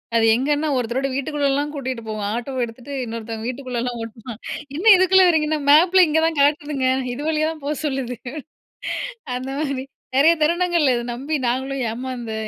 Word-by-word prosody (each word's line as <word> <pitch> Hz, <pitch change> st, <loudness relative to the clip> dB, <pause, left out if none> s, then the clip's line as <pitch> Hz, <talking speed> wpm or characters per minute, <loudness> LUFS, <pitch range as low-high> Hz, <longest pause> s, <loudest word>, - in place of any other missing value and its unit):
அது 225 Hz, -1 st, +4 dB
எங்கேன்னா, 295 Hz, +4 st, 0 dB
ஒருத்தரோட 250 Hz, +3 st, -1 dB
வீட்டுக்குள்ளேலாம் 285 Hz, 0 st, 0 dB
கூட்டிட்டு 260 Hz, -4 st, -4 dB
போகும். 215 Hz, -1 st, -3 dB
ஆட்டோ 245 Hz, +3 st, -4 dB
எடுத்துட்டு 245 Hz, +5 st, -10 dB
இன்னொருத்தங்க 225 Hz, 0 st, -5 dB
வீட்டுக்குள்ளலாம் 250 Hz, -2 st, -3 dB
ஓட்டுவான். 225 Hz, +1 st, -9 dB, 0.4 s
என்ன 380 Hz, -, -4 dB
இதுக்குள்ள 375 Hz, +1 st, +5 dB
வர்றீங்கன்னா, 310 Hz, -2 st, +1 dB
"மேப்ல 355 Hz, +4 st, +6 dB
இங்க 320 Hz, +1 st, +2 dB
தான் 325 Hz, -2 st, -3 dB
காட்டுதுங்க. 290 Hz, -2 st, +1 dB, 0.3 s
இது 280 Hz, -, -6 dB
வழியா 310 Hz, 0 st, +1 dB
தான் 310 Hz, -3 st, -11 dB
போ 300 Hz, -, 0 dB
சொல்லுது." 265 Hz, -4 st, -2 dB, 1.2 s
அந்த 255 Hz, +1 st, -6 dB
மாரி 275 Hz, -3 st, -2 dB, 0.3 s
நெறைய 320 Hz, +4 st, +6 dB
தருணங்கள்ல 340 Hz, -4 st, +2 dB
இத 240 Hz, -, -3 dB
நம்பி 285 Hz, +5 st, -3 dB
நாங்களும் 265 Hz, +1 st, -1 dB
ஏமாந்த 240 Hz, -2 st, -5 dB
275 Hz, 150 wpm, -21 LUFS, 245-305 Hz, 1.2 s, மேப்ல